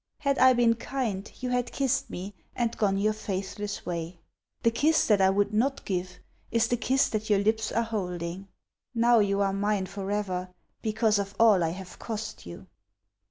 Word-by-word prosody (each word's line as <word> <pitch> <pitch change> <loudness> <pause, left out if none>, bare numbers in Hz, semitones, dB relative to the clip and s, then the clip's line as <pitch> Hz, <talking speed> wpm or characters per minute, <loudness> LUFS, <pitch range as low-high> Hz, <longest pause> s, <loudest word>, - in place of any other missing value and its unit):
Had 280 -2 0
I 260 0 +7
been 240 -1 +4
kind 230 -4 -3
you 250 0 -2
had 245 -1 0
kissed 275 0 0
me 190 +3 -6 0.2
and 235 -2 -1
gone 195 -2 +1
your 215 +2 +2
faithless 200 0 -4
way. 170 0 -4 0.4
The 230 - +4
kiss 310 +7 +3
that 210 -3 +3
I 190 - +5
would 205 +2 +1
not 270 +6 0
give 180 -1 -3 0.3
is 230 0 +2
the 245 - +1
kiss 265 +3 +2
that 215 -1 -3
your 205 - +5
lips 215 +2 +1
are 230 - +1
holding: 180 -4 -4 0.5
Now 235 0 +5
you 200 -1 +2
are 195 -1 +1
mine 200 -1 0
forever, 195 -1 -3 0.3
because 215 -1 +2
of 200 0 -4
all 215 -6 +6
I 165 - +1
have 185 +2 -8
cost 220 - -6
you. 85 - -9
210 Hz, 180 wpm, -28 LUFS, 195-230 Hz, 0.5 s, I